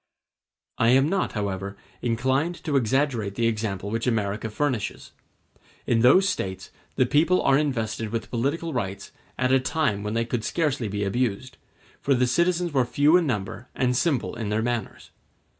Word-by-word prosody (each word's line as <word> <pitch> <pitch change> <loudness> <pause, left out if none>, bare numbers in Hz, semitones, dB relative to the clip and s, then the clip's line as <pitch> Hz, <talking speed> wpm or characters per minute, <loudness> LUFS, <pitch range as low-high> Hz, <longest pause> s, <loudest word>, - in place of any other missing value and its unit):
I 115 - +4
am 135 +3 +5
not, 195 +1 0
however, 100 -1 -3 0.2
inclined 130 +8 0
to 150 -4 -1
exaggerate 120 -4 +1
the 120 - 0
example 105 -3 -2
which 115 +2 -2
America 110 -2 -1
furnishes. 125 -1 -2 0.7
In 115 - +2
those 140 +12 +6
States 95 - -3 0.2
the 130 - +3
people 155 +7 +3
are 135 - +4
invested 115 -6 -1
with 115 +1 -4
political 145 +7 -1
rights 100 -5 -4 0.3
at 130 0 +1
a 135 - +5
time 130 -6 0
when 105 +1 -3
they 115 0 +1
could 120 -1 -2
scarcely 145 -8 -1
be 100 0 -2
abused, 120 +3 -2 0.4
for 140 - +2
the 125 0 +3
citizens 170 +5 +1
were 130 -2 +3
few 145 +6 +3
in 175 -3 +3
number 115 +1 -3
and 125 -1 +1
simple 140 0 0
in 115 -3 -4
their 110 +1 0
manners. 120 -1 -4
120 Hz, 165 wpm, -25 LUFS, 110-140 Hz, 0.7 s, those